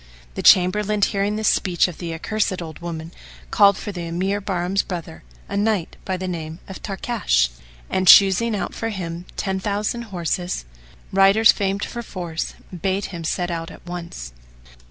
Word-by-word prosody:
The -, -, -4 dB
Chamberlain, 205 Hz, +3 st, +4 dB
hearing 200 Hz, +1 st, +1 dB
this 215 Hz, 0 st, 0 dB
speech 180 Hz, -2 st, +3 dB
of 180 Hz, -, -9 dB
the 170 Hz, -2 st, -4 dB
accursed 185 Hz, +3 st, -1 dB
old 160 Hz, -3 st, -7 dB
woman, 165 Hz, -1 st, -6 dB, 0.4 s
called 200 Hz, 0 st, +5 dB
for 210 Hz, -, -5 dB
the 175 Hz, -3 st, -5 dB
Emir 190 Hz, +4 st, -1 dB
Bahram's 190 Hz, 0 st, 0 dB
brother, 170 Hz, -, -7 dB, 0.3 s
a -, -, -5 dB
knight 205 Hz, -4 st, 0 dB
by 190 Hz, -1 st, -1 dB
name 165 Hz, -4 st, -5 dB
Tarkash; 195 Hz, -, 0 dB, 0.4 s
and, 185 Hz, 0 st, -1 dB
choosing 200 Hz, +5 st, +7 dB
out 200 Hz, -, -3 dB
for 225 Hz, -, -3 dB
him 175 Hz, -4 st, -5 dB
ten 190 Hz, -1 st, -1 dB
thousand 210 Hz, +4 st, -2 dB
horse, 180 Hz, -, -2 dB, 0.5 s
riders 195 Hz, +3 st, +6 dB
famed 200 Hz, -1 st, -1 dB
for 235 Hz, -, -6 dB
force, 175 Hz, -7 st, -5 dB, 0.2 s
bade 190 Hz, +3 st, -1 dB
him 170 Hz, -1 st, -5 dB
set 175 Hz, +2 st, -1 dB
out 165 Hz, -1 st, -4 dB
at -, -, -14 dB
once. 170 Hz, -, -7 dB
185 Hz, 155 wpm, -22 LUFS, 170-200 Hz, 0.5 s, choosing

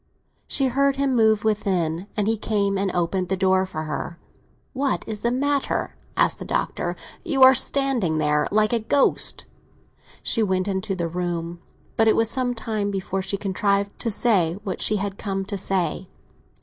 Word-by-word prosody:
She 275 Hz, -, +1 dB
heard 275 Hz, +2 st, +2 dB
him 275 Hz, -2 st, 0 dB
move 220 Hz, -1 st, +3 dB
within, 190 Hz, -5 st, -1 dB
and 210 Hz, -1 st, +1 dB
he 225 Hz, -, +2 dB
came 205 Hz, -2 st, 0 dB
and 195 Hz, 0 st, 0 dB
opened 180 Hz, +1 st, -1 dB
the 190 Hz, -, 0 dB
door 190 Hz, 0 st, +2 dB
for 155 Hz, -4 st, -5 dB
her. 155 Hz, +3 st, -5 dB, 0.6 s
"What 275 Hz, 0 st, -1 dB
is 215 Hz, -2 st, -5 dB
the 235 Hz, -, +1 dB
matter?" 280 Hz, +3 st, -1 dB, 0.2 s
asked -, -, +2 dB
the -, -, -6 dB
Doctor. -, -, -2 dB, 0.3 s
"You 280 Hz, -7 st, +2 dB
are 260 Hz, 0 st, +9 dB
standing 255 Hz, -, +2 dB
there 150 Hz, -1 st, +1 dB
like 215 Hz, +2 st, +2 dB
a 235 Hz, -, +2 dB
ghost." 270 Hz, +6 st, +2 dB, 0.8 s
She 230 Hz, -, +2 dB
went 190 Hz, -2 st, 0 dB
into 195 Hz, 0 st, -2 dB
the 170 Hz, -2 st, -2 dB
room, 170 Hz, 0 st, -4 dB, 0.4 s
but 225 Hz, -, +4 dB
it 220 Hz, -, +5 dB
was 225 Hz, 0 st, +2 dB
some 250 Hz, -2 st, 0 dB
time 215 Hz, -3 st, -2 dB
before 195 Hz, -1 st, -3 dB
she 200 Hz, +1 st, -2 dB
contrived 200 Hz, 0 st, -1 dB
to 235 Hz, -, -2 dB
say 200 Hz, -7 st, +3 dB
what 190 Hz, -4 st, -4 dB
she 215 Hz, -, +3 dB
had 200 Hz, -1 st, -3 dB
come 195 Hz, -1 st, -3 dB
to 200 Hz, -, -3 dB
say. 190 Hz, -1 st, -2 dB
200 Hz, 175 wpm, -23 LUFS, 185-230 Hz, 0.8 s, are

